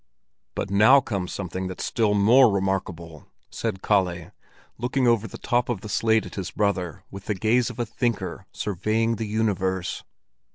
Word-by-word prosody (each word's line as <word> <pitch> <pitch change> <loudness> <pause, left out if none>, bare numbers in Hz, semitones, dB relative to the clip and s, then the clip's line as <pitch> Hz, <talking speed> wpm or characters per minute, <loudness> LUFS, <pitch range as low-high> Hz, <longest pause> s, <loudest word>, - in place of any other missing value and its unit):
"But 95 - -3
now 110 +8 +7
comes 100 -8 -4
something 95 -1 -4
that's 95 - -5
still 110 -3 +1
more 115 +5 +6
remarkable," 90 -5 -3 0.2
said 105 -5 -4
Kalle, 90 -5 0 0.5
looking 125 +2 0
over 115 -2 +2
the - - -9
top 120 -1 0
of 115 -7 -2
the 105 - -8
slate 110 +1 +2
at - - -10
his 95 -3 -4
brother 95 -6 -2
with 100 0 -9
the 105 - -1
gaze 115 +5 +2
of 125 - -9
a 120 - -1
thinker 115 0 -3
surveying 110 +4 -1
the 110 - -3
universe. 95 -4 -1
105 Hz, 165 wpm, -24 LUFS, 95-115 Hz, 0.5 s, now